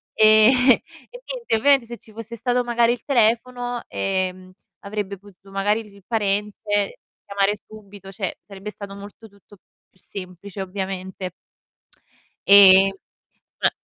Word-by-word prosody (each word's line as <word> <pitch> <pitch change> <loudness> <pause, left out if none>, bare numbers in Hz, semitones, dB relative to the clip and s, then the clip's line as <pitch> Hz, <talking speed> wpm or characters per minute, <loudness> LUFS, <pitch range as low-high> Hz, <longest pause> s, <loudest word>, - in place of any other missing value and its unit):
Ehm, 215 +2 +7 0.6
e - - -12
niente, 485 - -2
ovviamente 270 +2 +4
se 235 -1 -8
ci 220 - -18
fosse 230 +1 -8
stato 245 +2 0
magari 235 0 +2
il 245 - -3
telefono, 245 0 0
ehm, 185 -1 -3 0.3
avrebbe 200 -1 -5
potuto 195 0 -19
magari 205 +3 0
dici 205 -1 -17
il 200 - -18
parente 205 -1 -1 0.3
chiamare 200 0 +1
subito, 200 -2 -13
cioè, 195 -2 -4
sarebbe 200 +1 -9
stato 200 -1 -9
molto 205 +3 -12
tutto 200 0 -20 0.3
più 185 - -30
semplice, 190 +1 -9
ovviamente. 190 -1 -5 1.2
Eh, 195 -1 +8 0.7
ma - - +5
205 Hz, 130 wpm, -22 LUFS, 195-225 Hz, 1.2 s, Eh